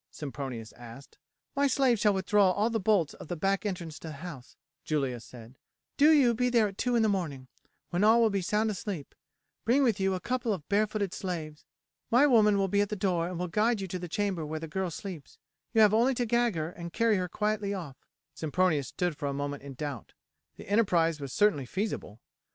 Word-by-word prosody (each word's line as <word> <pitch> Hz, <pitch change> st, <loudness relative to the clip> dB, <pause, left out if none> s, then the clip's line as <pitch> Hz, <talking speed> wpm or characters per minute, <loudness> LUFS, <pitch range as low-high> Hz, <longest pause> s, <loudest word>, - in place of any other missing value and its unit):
Sempronius 135 Hz, -6 st, -6 dB
asked. 120 Hz, +3 st, -13 dB, 0.4 s
"My 280 Hz, +1 st, +3 dB
slave 260 Hz, -4 st, +2 dB
shall 210 Hz, -2 st, +3 dB
withdraw 195 Hz, 0 st, +3 dB
all 210 Hz, +5 st, +1 dB
the 225 Hz, -, 0 dB
bolts 195 Hz, -6 st, +2 dB
of -, -, -11 dB
the 175 Hz, -, -3 dB
back 195 Hz, +5 st, 0 dB
entrance 170 Hz, -5 st, -5 dB
to -, -, -9 dB
the 155 Hz, -, -6 dB
house," 140 Hz, -5 st, -9 dB, 0.3 s
Julia 135 Hz, -5 st, -1 dB
said; 120 Hz, +1 st, -13 dB, 0.4 s
"do 295 Hz, +2 st, +6 dB
you 270 Hz, -6 st, +5 dB
be 250 Hz, +2 st, +1 dB
there 230 Hz, -3 st, +3 dB
at 195 Hz, -1 st, -10 dB
two 245 Hz, -1 st, +1 dB
in 230 Hz, -, +3 dB
the -, -, +3 dB
morning, 160 Hz, -10 st, -2 dB, 0.4 s
when 175 Hz, +3 st, +1 dB
all 220 Hz, +2 st, +6 dB
will 225 Hz, -2 st, +4 dB
be 200 Hz, -1 st, 0 dB
sound 215 Hz, +4 st, +1 dB
asleep; 190 Hz, -6 st, -5 dB, 0.5 s
bring 255 Hz, +5 st, +3 dB
with 225 Hz, -6 st, +2 dB
you 190 Hz, 0 st, +1 dB
a -, -, -3 dB
couple 240 Hz, 0 st, -1 dB
of 155 Hz, -6 st, -7 dB
barefooted 205 Hz, -2 st, 0 dB
slaves. 160 Hz, -5 st, -5 dB, 0.4 s
My 250 Hz, +5 st, +5 dB
woman 215 Hz, -7 st, +5 dB
will 195 Hz, -1 st, +1 dB
be 200 Hz, +2 st, +2 dB
at 205 Hz, -, 0 dB
the 210 Hz, -, -2 dB
door 180 Hz, -4 st, 0 dB
and 180 Hz, -1 st, -5 dB
will 180 Hz, +1 st, -2 dB
guide 215 Hz, +5 st, +1 dB
you 195 Hz, -, -4 dB
to 185 Hz, -, -4 dB
the 175 Hz, -, -6 dB
chamber 195 Hz, -3 st, -1 dB
where 155 Hz, +1 st, -4 dB
the 165 Hz, -, -6 dB
girl 190 Hz, +3 st, -2 dB
sleeps; 170 Hz, -2 st, -8 dB, 0.3 s
you 225 Hz, -, +4 dB
have 210 Hz, -1 st, +6 dB
only 245 Hz, +4 st, +3 dB
to 245 Hz, -, 0 dB
gag 235 Hz, -2 st, +1 dB
her 160 Hz, +1 st, -3 dB
and 170 Hz, -1 st, -8 dB
carry 230 Hz, +1 st, +2 dB
her 180 Hz, -1 st, -2 dB
quietly 210 Hz, 0 st, -1 dB
off." 170 Hz, -9 st, -6 dB, 0.4 s
Sempronius 160 Hz, -2 st, 0 dB
stood 175 Hz, -3 st, -2 dB
for 145 Hz, -1 st, -4 dB
a 140 Hz, -, -2 dB
moment 145 Hz, 0 st, -4 dB
in 140 Hz, -1 st, -9 dB
doubt. 140 Hz, -4 st, -6 dB, 0.4 s
The -, -, -12 dB
enterprise 175 Hz, -7 st, +2 dB
was 140 Hz, -2 st, -5 dB
certainly 195 Hz, -10 st, +2 dB
feasible. 190 Hz, -, -4 dB
190 Hz, 220 wpm, -29 LUFS, 155-215 Hz, 0.5 s, do